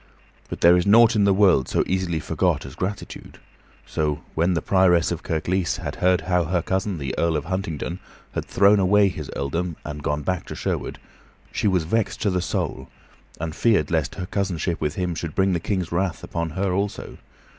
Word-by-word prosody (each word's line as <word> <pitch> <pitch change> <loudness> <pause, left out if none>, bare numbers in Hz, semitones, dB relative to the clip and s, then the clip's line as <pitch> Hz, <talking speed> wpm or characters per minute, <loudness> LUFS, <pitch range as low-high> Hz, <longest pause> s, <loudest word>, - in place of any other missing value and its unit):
But - - -6
there 85 +1 +7
is 90 +2 +1
nought 115 +3 +6
in 105 -1 +3
the 100 - +4
world 95 -10 +4
so - - +2
easily 90 -3 -1
forgot - - 0
as - - -9
gratitude; 100 +3 -6 0.5
so, 75 -1 -2
when 85 +3 +1
the 80 - 0
Prioress 90 -3 +3
of - - -3
Kirklees 90 +3 -1
had - - -5
heard 90 0 +3
how 90 -2 +1
her 85 +1 0
cousin, 95 0 -1
the 70 -3 -4
Earl 85 -2 +2
of 75 - -4
Huntingdon, 90 -1 -3 0.3
had - - -2
thrown 100 +1 +4
away 100 +1 +4
his 75 -5 -7
earldom 85 +5 -2
and 75 -1 -6
gone 75 +1 -2
back 90 +4 0
again - - -28
to - - -6
Sherwood, - - -3 0.5
she - - 0
was 95 -4 +2
vexed 110 +7 -1
to 100 - +2
the 90 0 0
soul, 65 -5 -3 0.5
and 80 0 -4
feared 100 -11 +2
lest 80 -4 0
her 95 - -4
cousinship 90 -3 -2
with 75 0 -1
him 90 -2 -1
should 80 -1 -5
bring 95 0 +2
the 85 - 0
King's 90 0 -2
wrath 90 0 -1
upon 85 -1 -3
her 95 -1 0
also. 100 +2 -3
90 Hz, 200 wpm, -23 LUFS, 80-95 Hz, 0.5 s, there